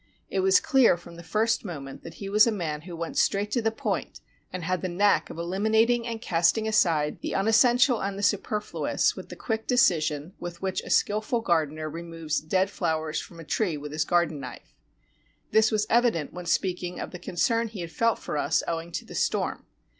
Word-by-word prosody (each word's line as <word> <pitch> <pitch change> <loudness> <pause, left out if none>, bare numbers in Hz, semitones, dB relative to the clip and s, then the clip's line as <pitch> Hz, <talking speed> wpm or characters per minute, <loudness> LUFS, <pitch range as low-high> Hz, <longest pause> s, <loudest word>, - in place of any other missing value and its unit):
It 195 - 0
was 190 0 +5
clear 260 -9 +4
from 170 0 -13
the 170 - -10
first 220 +8 0
moment 145 -9 -7
that 165 - -10
he 200 - -7
was 210 +3 +5
a - - +2
man 160 -7 -3
who 175 +1 -9
went 165 0 -3
straight 205 +1 +1
to 240 - +1
the 225 - +2
point 220 - -3 0.3
and 185 -2 -5
had 185 +1 -1
the 185 - -2
knack 200 +4 +2
of - - -8
eliminating 220 +7 +1
and 230 -1 -4
casting 185 +2 +2
aside 165 -8 +2
the - - -3
unessential 240 +4 +4
and 195 0 -3
the 200 - -5
superfluous 210 +1 0
with - - -9
the - - -8
quick 225 -2 -3
decision 165 - +2
with 175 -1 -7
which 190 0 -2
a - - -10
skillful 215 +3 +1
gardener 155 -6 0
removes 165 -1 -4
dead 185 +5 +1
flowers 160 -3 -1
from 170 - -12
a - - -8
tree 170 0 -1
with 145 0 -7
his 155 +1 0
garden 170 -2 +1
knife. 130 -2 -10 0.8
This 220 0 +5
was 215 -1 +1
evident 230 -10 +2
when 180 -1 -7
sp>eaking 180 0 -1
of - - -5
the 180 - -8
concern 230 +7 0
he 210 -4 -7
had 170 -1 -6
felt 230 +4 +1
for 150 - -4
us 150 +2 +1
owing 165 0 -3
to - - -4
the - - -11
storm. - - -1
185 Hz, 205 wpm, -26 LUFS, 165-220 Hz, 0.8 s, was